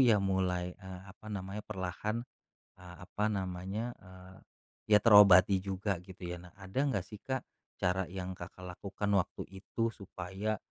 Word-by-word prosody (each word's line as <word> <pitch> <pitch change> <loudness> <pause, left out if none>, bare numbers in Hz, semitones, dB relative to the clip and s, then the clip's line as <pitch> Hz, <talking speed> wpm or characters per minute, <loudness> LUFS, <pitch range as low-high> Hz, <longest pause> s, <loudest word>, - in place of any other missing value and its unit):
ya 120 -5 +7
mulai, 90 -2 0
eee, 95 -2 -9
apa 100 +3 -12
namanya, 95 +1 -4
perlahan, 105 +4 -3 0.5
eee, 90 -1 -11
apa 105 +3 -1
namanya, 95 +4 -2
eee, 95 0 -14 0.5
ya 105 - +8
terobati 100 -3 +8
juga 95 0 -1
gitu 90 0 -12
ya? 90 0 -4
Nah 90 0 -14
ada 95 +1 -9
nggak 115 -10 0
sih, 105 - -9
Kak, 130 -1 -2 0.4
cara 90 +1 +2
yang 95 0 -5
Kakak 90 +1 -9
lakukan 100 +1 -3
waktu 90 - -1
itu 100 +4 -2
supaya, 100 +2 -4
95 Hz, 150 wpm, -33 LUFS, 90-105 Hz, 0.5 s, ya